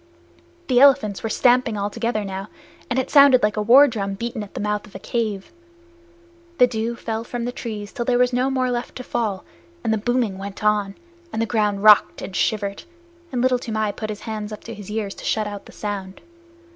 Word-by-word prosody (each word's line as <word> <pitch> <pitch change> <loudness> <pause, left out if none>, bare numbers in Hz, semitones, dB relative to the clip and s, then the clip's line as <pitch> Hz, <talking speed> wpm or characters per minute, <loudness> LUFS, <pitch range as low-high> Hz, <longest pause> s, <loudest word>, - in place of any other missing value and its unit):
The 250 -1 +4
elephants 250 -7 +4
were 225 - -3
stamping 245 -2 +3
all 205 +1 -2
together 230 -2 -2
now, 195 +1 -5 0.4
and 250 - -1
it 260 - -1
sounded 280 -4 +7
like 210 0 +2
a 210 - 0
war 255 +7 +7
drum 200 -5 -3
beaten 235 +2 -4
at 205 - -10
the - - -3
mouth 210 0 -2
of 205 - -19
a - - -6
cave. 215 -5 -3 1.1
The 250 - +7
dew 235 -1 -3
fell 225 -1 -4
from 240 0 -4
the 245 - -2
trees 215 -4 -6
till 240 - -2
there 245 0 +1
was 250 0 +2
no 255 +2 +1
more 255 -1 0
left 240 0 -4
to 255 - -6
fall, 210 -6 -2 0.4
and 225 - +1
the 220 - 0
booming 230 -3 0
went 200 +2 -7
on, 205 -2 +1 0.4
and - - -3
the 230 - +1
ground 210 -3 0
rocked 210 -1 +6
and 190 - -7
shivered, 200 -1 -1 0.5
and 250 -1 -1
Little 255 -1 +3
Toomai 220 -3 -2
put 215 +1 -6
his 210 -1 -6
hands 215 -1 -5
up 215 - -8
to 230 - -7
his 210 -3 -10
ears 210 -2 -3
to - - -12
shut 215 -1 0
out 205 -1 -7
the - - -13
sound. 195 -2 -5
220 Hz, 220 wpm, -22 LUFS, 205-245 Hz, 1.1 s, sounded